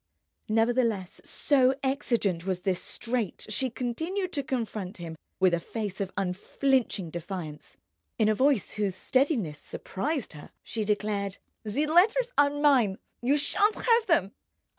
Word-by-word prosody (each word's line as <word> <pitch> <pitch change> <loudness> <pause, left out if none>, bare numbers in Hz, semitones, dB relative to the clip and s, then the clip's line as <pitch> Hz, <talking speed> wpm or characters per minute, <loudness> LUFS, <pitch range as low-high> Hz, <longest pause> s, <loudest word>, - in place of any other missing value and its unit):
Nevertheless, 225 -4 +1
so 265 -2 +3
exigent 235 -10 0
was 185 -1 -2
this 185 -1 0
strait, 235 -5 -3
she 255 +5 +1
continued 320 - -3
to 285 - 0
confront 225 -7 -3
him 165 -2 -7 0.2
with 185 -2 +4
a 170 - +2
face 205 +1 -5
of 195 -1 -2
unflinching 200 - 0
defiance. 170 -3 -6 0.4
In 220 - +3
a 215 - +4
voice 260 -1 +2
whose 200 -3 -1
steadiness 235 - +1
surprised 275 - -3
her 150 - -11
she 220 - -3
declared: 205 -2 -1 0.3
"The 230 +8 0
letters 430 +10 +4
are 285 0 +5
mine. 280 -9 +3 0.2
You 270 +4 +3
shan't 415 +8 +3
have 465 -1 +3
them." 205 - +3
225 Hz, 140 wpm, -28 LUFS, 190-280 Hz, 0.4 s, are